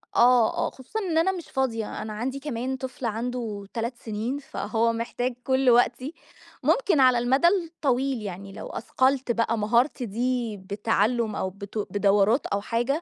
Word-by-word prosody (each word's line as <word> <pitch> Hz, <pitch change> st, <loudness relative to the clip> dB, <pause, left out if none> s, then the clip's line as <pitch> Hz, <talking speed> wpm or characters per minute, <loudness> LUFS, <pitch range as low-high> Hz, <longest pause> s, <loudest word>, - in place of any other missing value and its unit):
آه، 240 Hz, -2 st, +5 dB
آه. -, -, +1 dB
خصوصًا 265 Hz, -, -6 dB
إن 350 Hz, -6 st, -1 dB
أنا 360 Hz, +4 st, +4 dB
مش 355 Hz, -3 st, -7 dB
فاضية. 230 Hz, -6 st, -2 dB
أنا 215 Hz, 0 st, -5 dB
عندي 255 Hz, +6 st, -3 dB
كمان 265 Hz, -2 st, -3 dB
طفل 260 Hz, -1 st, -6 dB
عنده 225 Hz, -2 st, -3 dB
3 235 Hz, +2 st, -2 dB
سنين، 225 Hz, +5 st, -3 dB
فهو 230 Hz, -4 st, -1 dB
محتاج 245 Hz, +2 st, -2 dB
كل 260 Hz, 0 st, +3 dB
وقتي. 245 Hz, +4 st, +3 dB, 0.5 s
ممكن 400 Hz, -, +3 dB
على 255 Hz, -2 st, +6 dB
المدى 260 Hz, +7 st, +3 dB
الطويل 275 Hz, -, 0 dB
يعني 195 Hz, 0 st, -7 dB
لو -, -, -7 dB
أثقلت 260 Hz, +1 st, 0 dB
بقى 230 Hz, 0 st, +1 dB
مهارتي 240 Hz, +5 st, +1 dB
دي 235 Hz, 0 st, -1 dB
بِتَعلُّم، 215 Hz, +3 st, 0 dB
أو 190 Hz, -, -1 dB
بت 200 Hz, +2 st, -9 dB
بدورات 205 Hz, +4 st, +3 dB
أو 200 Hz, -, -1 dB
حاجة، 240 Hz, +9 st, -1 dB
240 Hz, 155 wpm, -26 LUFS, 220-265 Hz, 0.5 s, على